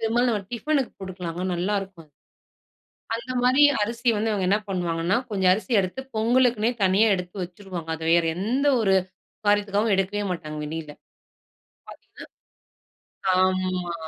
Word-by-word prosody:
பெரும்பாலும் 235 Hz, +2 st, +1 dB
நம்ம 210 Hz, -3 st, -1 dB
டிஃபனுக்கு 275 Hz, +2 st, -1 dB
குடுக்கலாங்க, 180 Hz, -2 st, -5 dB
நல்லா 185 Hz, +4 st, -1 dB
இருக்கும் 180 Hz, -5 st, -11 dB, 1.1 s
அத் 230 Hz, -, -4 dB
அந்த 255 Hz, -1 st, -5 dB
மாரி 260 Hz, +4 st, +5 dB, 0.2 s
அரிசி 235 Hz, +3 st, -2 dB
வந்து 220 Hz, +1 st, 0 dB
அவங்க 190 Hz, -3 st, 0 dB
என்னா 205 Hz, +2 st, +2 dB
பண்ணுவாங்கன்னா, 175 Hz, 0 st, 0 dB
கொஞ்சம் 190 Hz, -3 st, +3 dB
அரிசி 220 Hz, +6 st, -2 dB
எடுத்து 185 Hz, +8 st, -4 dB, 0.2 s
பொங்கலுக்குன்னே 235 Hz, 0 st, +3 dB
தனியா 200 Hz, +4 st, +4 dB
எடுத்து 180 Hz, +1 st, -7 dB
வச்சுருவாங்க. 180 Hz, -2 st, -7 dB
அத 160 Hz, -, -12 dB
வேற 170 Hz, -1 st, +4 dB
எந்த 245 Hz, +10 st, 0 dB
ஒரு 195 Hz, -3 st, +3 dB, 0.5 s
காரியத்துக்காவும் 205 Hz, +1 st, +2 dB
எடுக்கவே 195 Hz, +2 st, -1 dB
மாட்டாங்க 155 Hz, -3 st, -5 dB
வெளில 155 Hz, -1 st, -6 dB, 1.0 s
பாத்தீங்கன்னா. -, -, -13 dB, 1.1 s
ஆமா 185 Hz, -1 st, 0 dB
195 Hz, 130 wpm, -24 LUFS, 180-225 Hz, 1.1 s, மாரி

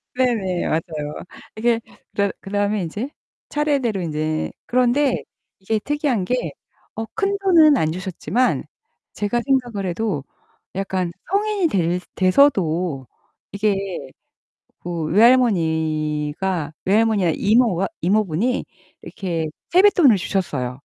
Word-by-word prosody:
네네. 220 Hz, -9 st, 0 dB
맞아요. 155 Hz, -2 st, -2 dB, 0.4 s
이렇게 230 Hz, +1 st, +1 dB, 0.3 s
그러 200 Hz, -1 st, +1 dB
그다음에 205 Hz, +1 st, -1 dB
인제 210 Hz, -, -4 dB, 0.4 s
차례대로 275 Hz, -9 st, 0 dB
인제 155 Hz, 0 st, -2 dB
그런데 255 Hz, +2 st, +2 dB, 0.4 s
이게 215 Hz, +3 st, -1 dB
특이한 280 Hz, -7 st, -1 dB
게 250 Hz, +3 st, -1 dB, 0.4 s
어 225 Hz, -, -4 dB
큰돈은 385 Hz, -, +4 dB
안 155 Hz, -, +1 dB
주셨지만 185 Hz, +6 st, -1 dB, 0.5 s
제가 215 Hz, +3 st, -1 dB
생각을 245 Hz, -7 st, 0 dB
해도 180 Hz, -6 st, -2 dB, 0.5 s
약간 185 Hz, -3 st, -2 dB, 0.2 s
성인이 405 Hz, -3 st, +1 dB
될 180 Hz, -1 st, 0 dB
돼서도 180 Hz, -, +2 dB, 0.5 s
이게 200 Hz, -1 st, +1 dB, 1.0 s
그 170 Hz, -2 st, -4 dB
외할머니가 160 Hz, -, +2 dB
외할머니나 205 Hz, -3 st, +3 dB
이모가 210 Hz, -4 st, +3 dB
이모분이 210 Hz, +4 st, +1 dB, 0.4 s
이렇게 165 Hz, -5 st, -3 dB, 0.2 s
세뱃돈을 355 Hz, -, +6 dB
주셨어요. 160 Hz, -9 st, -2 dB
200 Hz, 250 characters per minute, -21 LUFS, 170-250 Hz, 1.0 s, 세뱃돈을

